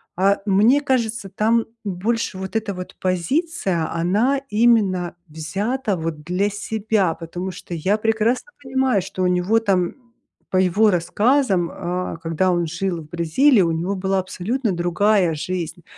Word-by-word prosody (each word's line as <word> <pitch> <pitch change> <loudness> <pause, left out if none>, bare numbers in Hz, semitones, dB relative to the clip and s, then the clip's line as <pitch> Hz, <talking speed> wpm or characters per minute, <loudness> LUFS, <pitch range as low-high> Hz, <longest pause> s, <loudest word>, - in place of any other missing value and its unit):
А 195 +2 +3
мне 215 +7 +4
кажется, 235 -6 -1
там 225 +4 +1 0.2
больше 205 +2 -2
вот 190 +3 -6
эта 220 -2 -1
вот 180 -1 -8
позиция, 185 - -1
она 205 +11 +1
именно 210 -6 +2
взята, 200 - -2
вот 160 -2 -4
для 180 +5 0
себя. 205 -3 0
Потому 175 +3 -6
что 180 - -9
я 185 +6 +1
прекрасно 225 - 0
понимаю, 260 -5 +1
что 185 0 -4
у - - +3
него 180 +5 +2
там, 190 -5 0 0.5
по 185 - 0
его 190 +4 +4
рассказам, 200 +1 +2
э, 180 -1 -4
когда 165 +3 +1
он 175 -1 0
жил 175 +1 -2
в 155 - -14
Бразилии 180 - +3
у 170 -2 +2
него 170 +5 -1
была 190 0 0
абсолютно 210 +6 -2
другая 175 0 +2
жизнь, 175 +1 -4
190 Hz, 145 wpm, -21 LUFS, 175-220 Hz, 0.5 s, мне